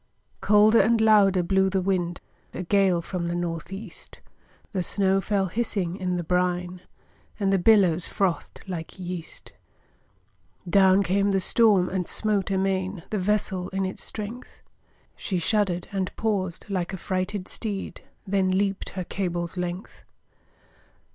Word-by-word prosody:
Colder 210 +2 +5
and 230 0 +3
louder 205 -4 +5
blew 190 +2 +2
the 190 0 0
wind, 180 -2 -1 0.3
A 180 - -3
gale 185 -2 +2
from 175 -1 -3
the 170 - -2
North 170 -1 -4
east; 195 -1 -8 0.5
The 190 - 0
snow 195 +1 +1
fell 200 -1 0
hissing 190 -3 -2
in 185 -2 -2
the 175 - -2
brine, 180 +1 -1 0.6
And 195 -1 +1
the 195 - +3
billows 180 -4 +4
frothed 190 -4 -2
like 170 -2 -6
yeast. 180 -2 -7 1.2
Down 190 +2 +5
came 195 +3 +1
the 195 -1 +2
storm, 200 -2 +4
and 180 -2 -2
smote 210 -3 0
amain 190 -1 -1
The 210 - 0
vessel 190 -2 0
in 195 0 -1
its 190 - -6
strength; 220 +4 -7 0.5
She 190 - -3
shudder'd 180 -1 0
and 190 -2 -2
paused, 195 -6 -2
like 185 -2 -2
a - - -3
frighted 185 +1 -3
steed, 205 -4 -5 0.2
Then 190 -1 +1
leap'd 195 +1 0
her 185 - -1
cable's 175 -2 -3
length. 180 +1 -5
190 Hz, 140 wpm, -25 LUFS, 180-200 Hz, 1.2 s, Colder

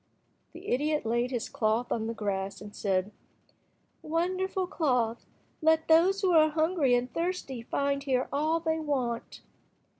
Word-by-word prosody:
The - - -9
idiot 300 +2 0
laid 235 +2 0
his 245 -3 -3
cloth 220 +3 0
on 220 -1 -1
the 230 - -4
grass, 195 -2 -3
and 205 0 -11
said— 195 0 0 0.9
"Wonderful 370 +4 -1
cloth, 250 -10 0 0.3
let 320 0 +3
those 355 +5 +4
who 370 - +3
are 310 -2 +6
hungry 315 -4 +2
and 245 +1 -2
thirsty 335 -8 -3
find 280 +4 -1
here 260 -2 0
all 310 +3 +1
they 320 -1 -1
want." 260 -6 -3
280 Hz, 145 wpm, -29 LUFS, 235-320 Hz, 0.9 s, are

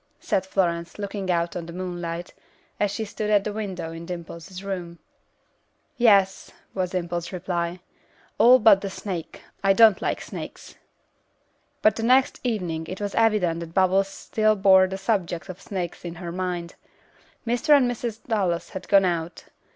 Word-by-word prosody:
said 190 0 -1
Florence, 170 -3 -1
looking 200 -2 -4
out 170 -1 0
on 170 -2 -5
the - - -7
moonlight, 175 -1 -5 0.5
as 205 - +2
she 220 +2 -3
stood 210 +1 -4
at 205 -2 +4
the 210 - -3
window 190 -6 -4
in 165 0 -8
Dimple's 175 +1 -8
room. 180 -3 -5 1.0
"Yes," 200 -5 +3 0.2
was 185 -2 -1
Dimple's 175 -1 -3
reply, 175 -1 -3 0.6
"all 250 +2 +8
but 210 -5 +6
the 195 - -3
snake. 190 -3 -6 0.2
I 195 0 +5
don't 220 0 +6
like - - -1
snakes." - - -8 1.1
But 215 0 +4
the - - -2
next 255 +3 +3
evening 175 -9 -2
it 185 - -6
was 205 -1 -3
evident 210 -7 +2
that 165 -1 -8
Bubbles 190 +1 +3
still 215 +2 0
bore 190 -2 +6
the 190 +1 -5
subject 190 -4 -2
of 185 +1 -8
snakes 180 -4 -5
in 170 -1 -6
her 175 -1 -6
mind. 180 -1 -3 0.7
Mr. 245 +6 +4
and 270 - +3
Mrs. 235 -2 -4
Dallas 190 -7 0
had 185 -1 -7
gone 195 -1 +5
out. 170 -1 -2
190 Hz, 160 wpm, -24 LUFS, 175-210 Hz, 1.1 s, all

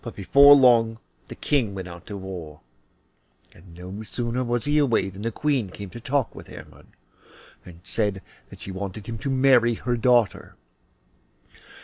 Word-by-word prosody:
Before 140 +8 +7
long 115 -4 +4 0.3
the - - -9
King 120 -9 -1
went 95 -1 -6
out 85 -1 -12
to 100 - -6
war, 90 -6 -9 0.9
and 85 0 -17
no 90 +4 -8
sooner 120 +3 -3
was 120 -1 -2
he 145 +1 +2
away 120 -9 +1
than 95 +2 -11
the 115 +2 -2
Queen 135 -6 -1
came 100 0 -9
to 120 - -9
talk 135 +1 -1
with - - -12
Hermod, - - -13 0.8
and 85 -1 -14
said 100 -4 -2 0.3
that - - -14
she 95 - -7
wanted 100 +2 -6
him 115 -1 -6
to 140 - -4
marry 130 -3 +3
her 120 +2 -2
daughter. 120 -3 +1
115 Hz, 160 wpm, -24 LUFS, 95-125 Hz, 0.9 s, Before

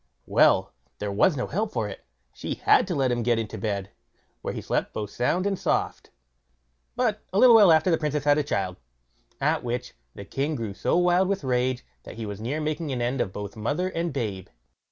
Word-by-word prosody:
Well! - - +3 0.2
there 105 -1 -3
was 140 - +3
no 125 - -1
help 210 +7 -2
for 115 -4 -1
it; 100 - -9 0.3
she - - -4
had - - +4
to 180 - -2
let 135 -3 +1
him 120 0 0
get 120 0 +2
into 110 -2 -4
bed, 100 -3 -3 0.5
where - - -3
he - - -5
slept - - -2
both 105 -2 -4
sound 175 +10 0
and 195 -2 -1
soft; - - -1 0.9
but - - 0
a 190 - -1
little 240 +1 +8
while 205 -6 +8
after 160 +3 +4
the 165 - +2
Princess 150 -2 -1
had 145 +1 +4
a - - +1
child, 95 -9 -2 0.6
at - - +1
which 120 +1 -3 0.2
the 100 - -8
king 140 +8 -2
grew 115 -5 -4
so 130 - 0
wild 180 +1 +3
with 195 -4 -1
rage, 125 -1 0 0.2
that - - -11
he 115 -1 -5
was 105 0 -6
near 135 +7 -2
making 155 0 -2
an 130 - -2
end 120 +2 0
of 95 - -2
both 100 0 -7
mother 145 +12 -1
and 170 -1 -2
babe. 105 -9 -4
130 Hz, 215 wpm, -26 LUFS, 110-165 Hz, 0.9 s, little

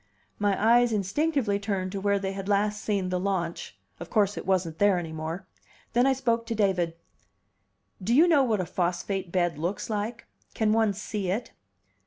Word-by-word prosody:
My 205 -1 +2
eyes 235 +2 +4
instinctively 215 - 0
turned 195 -2 -2
to 195 0 -4
where 200 0 +2
they 195 -1 -2
had 195 0 -5
last 210 +1 +1
seen 195 -3 0
the 180 0 0
launch; 180 -3 -3 0.2
of - - -8
course 205 -2 +2
it - - -7
wasn't 175 -4 0
there 205 -2 +4
any 165 -2 -4
more. 160 +4 -5 0.5
Then 245 +2 +4
I 270 - +4
spoke 235 -3 0
to 230 - -2
David. 185 -5 +1 1.1
"Do 225 +6 +1
you 325 +5 +7
know 315 -5 +5
what 225 -6 +1
a - - -3
phosphate 180 +1 -2
bed 175 -4 0
looks 180 +7 -3
like? 215 +3 -3 0.3
Can 215 -1 +2
one 220 -2 +3
see 205 -1 -4
it?" 215 +6 -2
200 Hz, 185 wpm, -27 LUFS, 185-220 Hz, 1.1 s, you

